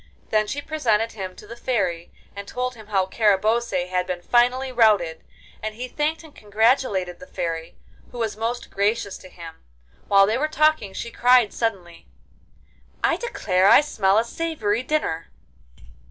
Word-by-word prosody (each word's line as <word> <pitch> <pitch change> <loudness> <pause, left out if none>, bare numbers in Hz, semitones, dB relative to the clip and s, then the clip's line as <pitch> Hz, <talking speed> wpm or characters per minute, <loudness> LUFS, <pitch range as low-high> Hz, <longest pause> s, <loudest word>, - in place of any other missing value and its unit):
Then 215 -1 +2
she 290 +6 -4
presented 230 -8 0
him 190 -3 -7
to - - -13
the 235 - -9
Fairy, 190 -9 -2 0.2
and 200 0 -7
told 250 0 -3
him 220 -3 -14
how 195 -3 +1
Carabosse 210 -1 +1
had 180 0 0
been 180 -1 -4
finally 250 +4 +2
routed, 210 -9 +2 0.4
and 215 0 -4
he 250 +3 -5
thanked 300 +5 -2
and 315 -2 -15
congratulated 210 -4 0
the 275 - -12
Fairy, 165 -6 -5 0.3
who 245 - -10
was 225 -3 -2
most 230 +3 -4
gracious 200 0 0
to 185 - -13
him. 165 -2 -12 0.4
While 195 -1 +6
they 220 +5 0
were 305 - +1
talking 310 -9 +1
she 235 - -6
cried 245 -3 +4
suddenly: 190 -7 -4 1.0
'I - - +3
declare 190 - +1
I - - +8
smell 205 -9 +1
a 225 - +4
savoury 235 -5 -2
dinner. 255 - -2
215 Hz, 160 wpm, -23 LUFS, 190-250 Hz, 1.0 s, I